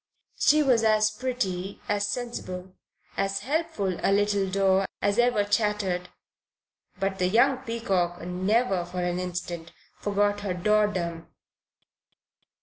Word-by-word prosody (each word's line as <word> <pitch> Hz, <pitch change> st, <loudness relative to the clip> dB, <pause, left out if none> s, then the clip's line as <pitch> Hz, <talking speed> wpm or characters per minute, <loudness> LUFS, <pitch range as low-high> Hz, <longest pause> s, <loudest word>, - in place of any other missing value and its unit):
She 305 Hz, 0 st, +5 dB
was 245 Hz, -5 st, +3 dB
as 215 Hz, -1 st, +4 dB
pretty, 210 Hz, -6 st, -3 dB
as 205 Hz, 0 st, 0 dB
sensible, 190 Hz, -5 st, -5 dB, 0.4 s
as 195 Hz, 0 st, 0 dB
helpful 265 Hz, -, -1 dB
a -, -, +2 dB
little 200 Hz, -1 st, +2 dB
daw 195 Hz, 0 st, +3 dB
as 205 Hz, +3 st, +1 dB
ever 240 Hz, -4 st, +3 dB
chattered; 205 Hz, -3 st, 0 dB, 0.9 s
but 195 Hz, 0 st, -1 dB
the 180 Hz, -, +2 dB
young 240 Hz, +7 st, +4 dB
peacock 195 Hz, -8 st, -1 dB
never 185 Hz, +3 st, 0 dB
for 175 Hz, +1 st, -4 dB
an 175 Hz, 0 st, -1 dB
instant 175 Hz, -2 st, -5 dB, 0.3 s
forgot 205 Hz, 0 st, +1 dB
her 200 Hz, -3 st, -3 dB
daw 210 Hz, +3 st, +3 dB
dom. 170 Hz, -4 st, -4 dB
200 Hz, 125 wpm, -26 LUFS, 180-215 Hz, 0.9 s, She